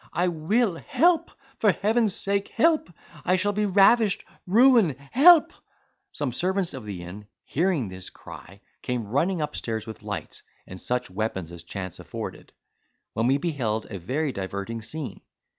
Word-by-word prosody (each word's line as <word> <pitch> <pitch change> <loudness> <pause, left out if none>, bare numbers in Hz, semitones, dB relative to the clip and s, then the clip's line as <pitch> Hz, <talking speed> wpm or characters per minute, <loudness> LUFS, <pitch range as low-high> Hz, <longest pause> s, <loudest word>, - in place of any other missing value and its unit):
I 175 +2 +1
will! 175 +4 +1
Help! 335 - +2 0.3
for 210 - +5
heaven's 215 -1 +1
sake! 200 0 -1
help! 310 - +2 0.3
I 185 - +3
shall 205 +3 0
be 210 +1 0
ravished! 200 +2 +4 0.2
ruined! 225 - +5 0.2
help!" 335 +4 +7 0.6
Some 145 -4 -2
servants 185 +4 -1
of 130 -5 -7
the 95 -4 -6
inn, 100 +4 -9 0.2
hearing 165 - 0
this 95 0 -6
cry, 100 +2 -13 0.2
came 125 -3 -2
running 165 - +1
upstairs 115 -7 -3
with 110 -3 -9
lights, - - -6 0.2
and 90 0 -9
such 125 -5 -2
weapons 95 -4 -3
as 85 -1 -8
chance 95 +1 -7
afforded; - - -7 0.6
when 115 +2 +1
we 135 +2 +4
beheld 130 -9 -2
a 100 - -5
very 140 - -1
diverting 100 +3 -5
scene. 145 +5 -5
155 Hz, 150 wpm, -25 LUFS, -, 0.6 s, help